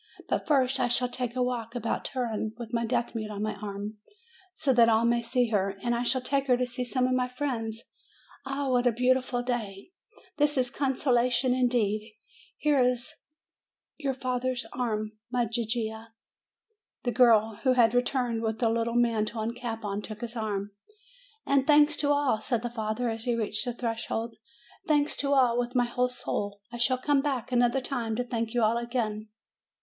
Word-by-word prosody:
But - - -1
first 270 -2 +3
I 250 - +2
shall 245 +1 +2
take 250 -1 -4
a 255 - +2
walk 240 -2 -3
about 230 -2 -2
Turin, 225 -4 -2
with 235 -2 -8
my 230 -1 0
deaf 240 0 -1
mute 215 -2 -4
on 205 0 -4
my 215 - -1
arm, 205 +1 -6 0.5
so 290 -7 +1
that 235 -2 +6
all 225 +1 +3
may 235 0 +3
see 240 0 +1
her, 195 -2 0
and 240 - +1
I 235 - 0
shall 255 +1 +1
take 275 +1 0
her 250 -1 +4
to 250 - +1
see 250 +1 -3
some 250 +1 0
of 255 - +1
my 250 0 +1
friends! 240 -4 -3 0.6
Ah, 275 0 -2
what 250 0 +3
a - - +5
beautiful 250 +1 +1
day! 230 - -4 0.5
This 295 -1 +2
is 250 -1 +1
consolation 250 -2 +2
indeed! 220 -4 0 0.4
Here's 250 -5 +2 0.8
your 275 -4 -2
father's 255 -1 -2
arm, 215 -4 -2 0.2
my 245 -1 +1
Gigia." 225 0 -3 0.9
The 245 - 0
girl, 225 -3 +4
who 260 - +3
had 235 -2 +4
returned 245 -2 +1
with 220 +1 -2
a 230 - +4
little 230 +1 0
mantle 225 -2 +1
and 230 +2 -3
cap 230 -2 -5
on, 200 0 -2
took 215 0 -8
his 235 0 -5
arm. 205 -3 -3 0.7
"And 275 -1 +2
thanks 300 0 +6
to 290 - 0
all!" 285 -7 +2
said 235 0 -1
the 240 - -3
father, 220 +1 -2
as 225 0 -5
he 240 -1 +1
reached 220 0 -1
the 245 - -2
threshold. 230 -1 -3 0.5
"Thanks 295 -1 +2
to 280 0 0
all, 245 -3 +4
with 245 +1 -2
my 245 -1 +4
whole 250 +1 0
soul! 205 -4 -3
I - - -4
shall 255 +2 +2
come 275 +2 +2
back 270 -5 -2
another 245 +2 +3
time 240 -4 -2
to 245 - 0
thank 230 -1 -3
you 240 - +3
all 225 +2 +3
again." 225 -3 -2
240 Hz, 185 wpm, -28 LUFS, 225-255 Hz, 0.9 s, that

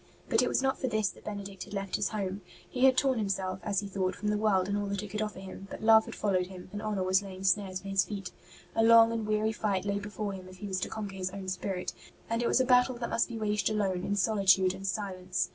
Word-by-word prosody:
But - - +4
it - - +2
was - - +1
not 265 0 +1
for 260 - -1
this 215 -4 +1
that - - -14
Benedict 200 -2 -6
had 205 - -8
left 195 -1 -2
his - - 0
home. 200 -2 -3 0.3
He 255 +1 +1
had 260 -1 +5
torn 260 -3 +2
himself, 190 -2 -2
as 200 +2 0
he 200 - -5
thought, 190 -2 -1
from 210 - -2
the 210 - +1
world 195 -4 +2
and 200 - -1
all 205 0 -1
that 200 0 -2
it 210 - -7
could 210 +2 -3
offer 210 -3 -3
him; 190 +1 -9
but - - -8
love 220 0 +7
had - - -8
followed 185 -3 +1
him, 185 -1 -10
and 205 - -5
honour 210 -3 -1
was 185 +1 +3
laying 190 -1 -8
snares 190 -1 +1
for 195 - -10
his 195 -1 +3
feet. 200 -3 -6 0.4
A 225 - +3
long 230 0 +7
and 225 -2 -2
weary 215 +1 +1
fight 200 -3 -1
lay 200 0 0
before 205 0 -4
him 185 -1 -8
if 185 - -13
he 205 - -7
was 190 -2 -2
to - - -3
conquer 205 -3 -5
his 185 -1 -2
own 195 0 -7
spirit, 185 0 -3 0.4
and 230 +1 +1
it 240 - +1
was - - +3
a 260 - +3
battle 250 0 +4
that 235 0 -4
must 230 - +1
be 230 - -5
waged 210 -2 0
alone, 195 -4 0
in 200 - -1
solitude 190 -3 +4
and 195 +1 -6
silence. 185 -2 -2
200 Hz, 280 wpm, -30 LUFS, 190-215 Hz, 0.4 s, love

